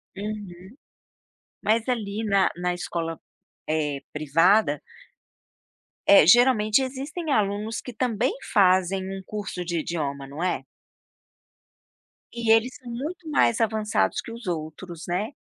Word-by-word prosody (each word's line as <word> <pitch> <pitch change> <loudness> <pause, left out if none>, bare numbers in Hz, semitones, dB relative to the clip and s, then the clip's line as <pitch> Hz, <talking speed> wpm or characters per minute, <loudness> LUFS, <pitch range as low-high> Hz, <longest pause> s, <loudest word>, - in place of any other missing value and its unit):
Uhum. 200 -1 -7 0.9
Mas, 225 +3 +1
ali, 220 -3 -2
na 200 -2 +3
na 180 0 -1
escola, 165 -2 -4 0.5
eh, 150 -3 -1
privada, 155 +2 +3 1.3
eh, 200 -6 +8
geralmente 240 +1 +5
existem 280 +5 -4
alunos 210 0 0
que, 250 - -8
também, 245 +1 0 0.2
fazem 190 -1 +4
um 195 0 -5
curso 200 -4 -5
de 170 -1 -1
idioma, 140 -4 -3
não 145 +5 -6
é? 180 - -1 1.7
E 235 -1 0
eles 225 +3 +3
são 250 - -12
muito 310 +7 -5
mais 235 -6 +3
avançados 215 -1 +1
que 230 - -10
os 235 -1 -9
outros, 165 +1 -5
né. 195 +8 -1
200 Hz, 120 wpm, -25 LUFS, 175-230 Hz, 1.7 s, eh